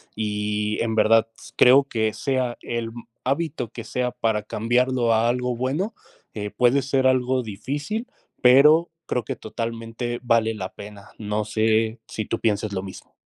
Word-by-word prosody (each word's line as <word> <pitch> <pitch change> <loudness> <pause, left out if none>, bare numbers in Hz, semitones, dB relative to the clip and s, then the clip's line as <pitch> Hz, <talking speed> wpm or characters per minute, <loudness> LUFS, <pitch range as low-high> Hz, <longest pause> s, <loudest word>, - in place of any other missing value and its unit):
Y 105 0 -1
en 115 -1 0
verdad 115 +1 +4
s - - -14
creo 130 +3 +7
que 110 -5 -1
sea 125 +1 -1
el 115 -1 -4 0.3
hábito 135 -3 -2
que 115 - -8
sea 125 +2 -2
para 110 -3 -1
cambiarlo 120 +3 +1
a 110 +1 +3
algo 125 0 0
bueno, 145 - -2 0.4
eh, 105 -1 -4
puede 125 +2 +3
ser 135 0 +1
algo 130 0 +2
difícil, 145 - -4 0.4
pero 150 +7 +6 0.2
creo 125 - -1
que - - -3
totalmente 115 +1 -5
vale 115 -2 +2
la 95 -4 -6
pena. 100 -1 -11
No 105 0 -2
sé 110 +1 +1
si 110 - -4
tú - - -3
pienses 105 -2 0
lo 95 -1 -3
mismo. 95 -1 -11
115 Hz, 160 wpm, -23 LUFS, 110-130 Hz, 0.4 s, creo